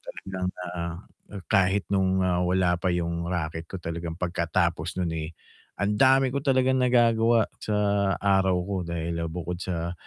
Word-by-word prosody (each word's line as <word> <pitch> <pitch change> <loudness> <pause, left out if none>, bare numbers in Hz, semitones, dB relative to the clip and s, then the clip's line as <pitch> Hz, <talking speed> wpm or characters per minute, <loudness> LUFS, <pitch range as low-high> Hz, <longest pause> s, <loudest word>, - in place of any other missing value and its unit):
talagang, 95 -1 -5 0.3
ah, 85 -1 -3 0.6
kahit 95 -1 +3
nung, 95 -1 +2
ah, 90 -1 +1
wala 90 -1 +2
pa 95 - -1
yung 85 0 -2
raket 80 -2 -3
ko 95 - -6
talagang 85 0 -4
pagkatapos 85 0 -1
nun, 85 -2 0
eh, 80 0 -5 0.5
ang 105 +1 0
dami 130 0 +5
ko 140 - -1
talagang 130 -1 +2
nagagawa 115 -2 +3
sa 105 - -3 0.5
araw 95 -2 +3
ko. 100 +1 -4
Dahil 85 0 -3
bukod 90 +1 -5
sa 85 -2 -3
90 Hz, 150 wpm, -26 LUFS, 85-100 Hz, 0.6 s, dami